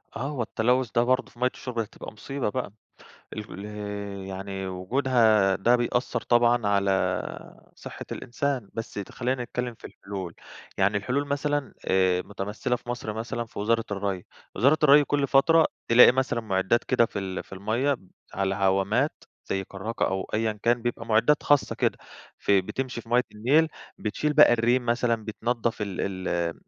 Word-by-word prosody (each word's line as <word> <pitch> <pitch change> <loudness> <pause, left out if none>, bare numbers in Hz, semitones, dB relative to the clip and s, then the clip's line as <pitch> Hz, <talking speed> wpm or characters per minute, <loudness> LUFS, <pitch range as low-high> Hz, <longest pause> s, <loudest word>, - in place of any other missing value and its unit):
آه، - - -5
هو 145 -4 -3
التلوث 125 +2 +1
ده 120 - +4
برضه 130 +2 +1
في 120 - -20
مَيَّة 125 +1 +3
الشُرب 125 -3 -5
هتبقى 110 0 -6
مصيبة 135 +2 -3
بقى 130 -2 -3 0.6
ال 105 -2 -7 0.6
يعني 95 0 -5
وجودها 110 0 +2
ده 120 +5 +4
بيأثر 120 +1 -1
طبعًا 120 -2 +3
على 100 -1 +2 0.8
صحة - - -9
الإنسان. 130 -2 -3
بس 115 - -5
ت 100 -2 -6
خلينا 125 0 -1
نتكلم 120 0 -4
في - - -25
الحلول، 95 -4 -7 0.4
يعني 100 +2 +3
الحلول 130 +8 -1
مثلًا 145 0 -1
آآ، 95 -1 +2
متمثّلة 105 +5 -3
في 120 - -18
مصر 120 -3 -3
مثلًا 120 +2 -4
في 115 - -12
وزارة 115 +2 +1
الري، 100 -2 -2 0.3
وزارة 140 +9 +4
الري 145 0 +7
كل 145 -1 0
فترة 160 +4 +5 0.2
تلاقي 120 +1 +8
مثلًا 130 -2 0
معدات 100 +1 +1
كده 120 -3 +3
في 100 - -6
ال 95 -1 -4
في - - -23
المَيَّة 115 +9 0 0.4
على 95 0 0
عوامات 100 +8 +1 0.2
زي 95 0 -1
كراكة 100 +5 -3
أو 95 0 -2
أيًا 110 0 +1
كان، 120 0 +2
بيبقى 115 -1 -3
معدات 115 +7 +3
خاصة 145 -1 +2
كده - - 0 0.4
ف - - -3
بت 95 -2 +4
بتمشي 130 +3 -4
في 115 - -18
مية 120 +2 +4
النيل 140 +10 +3 0.3
بتشيل 150 +8 -1
بقى 150 -4 +7
الريم 120 +2 +2
مثلًا، 115 -2 +1
بتنضف 115 +1 -2
ال 100 -3 -4 0.3
ال 85 -1 -1
115 Hz, 165 wpm, -26 LUFS, 100-125 Hz, 0.8 s, تلاقي